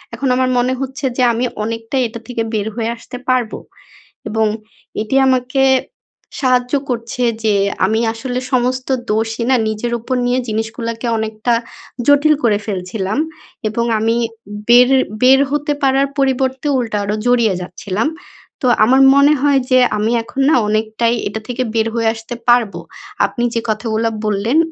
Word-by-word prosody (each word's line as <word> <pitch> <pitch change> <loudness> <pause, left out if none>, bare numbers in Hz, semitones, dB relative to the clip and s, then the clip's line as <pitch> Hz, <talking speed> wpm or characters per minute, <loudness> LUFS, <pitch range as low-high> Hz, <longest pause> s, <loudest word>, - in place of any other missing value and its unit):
এখন 275 - -2
আমার 255 0 +1
মনে 250 +1 +1
হচ্ছে 270 +1 -4
যে 255 - +2
আমি 235 +2 0 0.2
অনেকটাই 225 +4 -2
এটা 230 +1 -8
থেকে 245 -2 -3
বের 210 -1 -1
হয়ে 230 -1 -2
আসতে 250 +2 -9
পারবো 250 -4 +1 0.7
এবং 220 0 +1 0.5
এটি 220 +5 -2
আমাকে 255 +1 +1 0.8
সাহায্য 250 -1 +1 0.2
করছে 235 0 -3 0.2
যে 215 -1 +2 0.3
আমি 220 +3 +1
আসলে 245 +2 -4
সমস্ত 255 0 0 0.2
দোষই 225 +2 -1
না 260 - +5
নিজের 220 +2 -3
উপর 255 +3 -3
নিয়ে 245 +1 +1
জিনিসগুলাকে 225 +2 -3
অনেকটা 220 +2 -1 0.5
জটিল 290 +2 +5
করে 215 -3 +3
ফেলছিলাম। 190 +1 -3 0.5
এবং 235 +2 -1
আমি 225 +1 +1 0.5
বের 245 +1 +7 0.3
বের 260 +1 +6
হতে 295 0 0
পারার 270 +1 +3
পরিবর্তে 265 0 0
উল্টা 230 -4 -2
আরো 205 +1 -1
জড়িয়ে 235 -4 +3
যাচ্ছিলাম। 185 +6 -3 0.5
তো - - -2 0.2
আমার 260 +5 +4
মনে 280 +2 +5
হয় 285 -1 +3
যে 255 - +6 0.2
আমি 215 +2 0
এখন 265 +4 -4
না 315 - +4
অনেকটাই 220 +2 0
এটা 205 +2 -4
থেকে 250 +1 -2
বের 225 0 +2
হয়ে 230 -1 +1
আসতে 225 +2 -8
পারবো। 225 -7 +3 0.5
আপনি 200 +4 -3
যে 230 - +1
কথাগুলা 220 +1 0 0.2
বললেন 215 +6 0
235 Hz, 150 wpm, -17 LUFS, 220-255 Hz, 0.8 s, বের